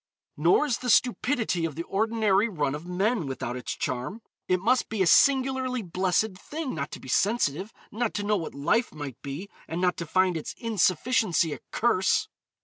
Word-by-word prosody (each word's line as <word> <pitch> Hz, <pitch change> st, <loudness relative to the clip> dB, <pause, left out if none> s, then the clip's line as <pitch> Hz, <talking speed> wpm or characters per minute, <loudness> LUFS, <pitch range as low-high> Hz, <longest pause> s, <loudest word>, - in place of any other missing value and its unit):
Nor 170 Hz, -, +3 dB
is 255 Hz, -6 st, -1 dB
the 250 Hz, -, -3 dB
stupidity 240 Hz, -, +2 dB
of 160 Hz, -4 st, -2 dB
the 165 Hz, -, -3 dB
ordinary 215 Hz, +1 st, +1 dB
run 145 Hz, -8 st, -1 dB
of 150 Hz, +4 st, -7 dB
men 190 Hz, -, 0 dB
without 125 Hz, -2 st, -4 dB
its 125 Hz, -, -5 dB
charm. 130 Hz, -, -4 dB, 0.2 s
It 185 Hz, 0 st, +2 dB
must 240 Hz, +6 st, +2 dB
be 215 Hz, -4 st, +1 dB
a -, -, +1 dB
singularly 260 Hz, +3 st, +3 dB
blessed 185 Hz, +3 st, 0 dB
thing 305 Hz, +3 st, -5 dB
not 145 Hz, -2 st, -3 dB
to -, -, -6 dB
be -, -, -12 dB
sensitive, 195 Hz, -, +1 dB, 0.2 s
not 230 Hz, +1 st, -2 dB
to 205 Hz, -, -1 dB
know 210 Hz, +1 st, +2 dB
what 165 Hz, -6 st, -6 dB
life 185 Hz, -, +1 dB
might 145 Hz, -5 st, -7 dB
be, 145 Hz, +8 st, -6 dB, 0.2 s
and 165 Hz, -, -4 dB
not 180 Hz, 0 st, +1 dB
to 170 Hz, -, -5 dB
find 185 Hz, +1 st, +2 dB
its 155 Hz, -, -6 dB
insufficiency 195 Hz, -5 st, +1 dB
a -, -, -7 dB
curse. 215 Hz, -5 st, +1 dB
190 Hz, 185 wpm, -27 LUFS, 165-230 Hz, 0.2 s, Nor